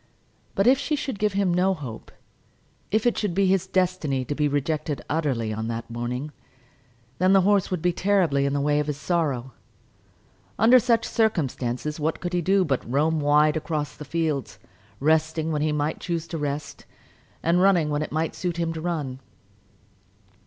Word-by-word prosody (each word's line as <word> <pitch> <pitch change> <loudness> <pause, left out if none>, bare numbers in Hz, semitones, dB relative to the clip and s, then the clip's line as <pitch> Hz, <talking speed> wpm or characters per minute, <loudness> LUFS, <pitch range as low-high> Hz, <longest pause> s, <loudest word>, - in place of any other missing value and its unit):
But 195 - +2
if 260 +2 +5
she 285 +2 -1
should 265 -7 -4
give 210 -2 +1
him 195 -3 +1
no 185 +2 +2
hope, 130 -9 -8 0.8
if 215 +3 +1
it 240 - +2
should 205 -5 -2
be 195 0 +3
his 190 -1 +2
destiny 175 -8 0
to 145 - -2
be 150 0 +1
rejected 145 -1 -2
utterly 130 -9 -1
on 110 +1 -3
that 115 0 -5
morning, 125 +5 -4 0.9
then 185 +2 +4
the 195 - +6
horse 200 0 +2
would 180 -3 -3
be 180 -1 +2
terribly 170 -8 +2
in 140 - -1
the 145 - 0
way 145 +1 +2
of 150 - -1
his 150 -2 -2
sorrow. 140 -5 -1 1.1
Under 240 +4 +7
such 235 -2 +2
circumstances 150 - -1
what 155 +2 -1
could 175 0 -4
he 175 - +1
do 190 +2 +3
but 135 -5 0
roam 155 +4 +2
wide 150 +1 +3
about 160 - -2
across 150 -6 -3
the 150 - -9
fields, 150 -4 -2 0.4
resting 160 +2 +1
when 150 -1 -1
he 155 0 +1
might 150 +1 -1
choose 170 -2 -3
to 165 - -4
rest, 145 0 -4 0.6
and 170 +2 +3
running 180 -6 +3
when 145 0 0
it 155 - -4
might 160 +1 -1
suit 175 -2 -3
him 165 -1 -1
to 160 - -6
run. 150 -7 -3
160 Hz, 185 wpm, -25 LUFS, 145-185 Hz, 1.1 s, Under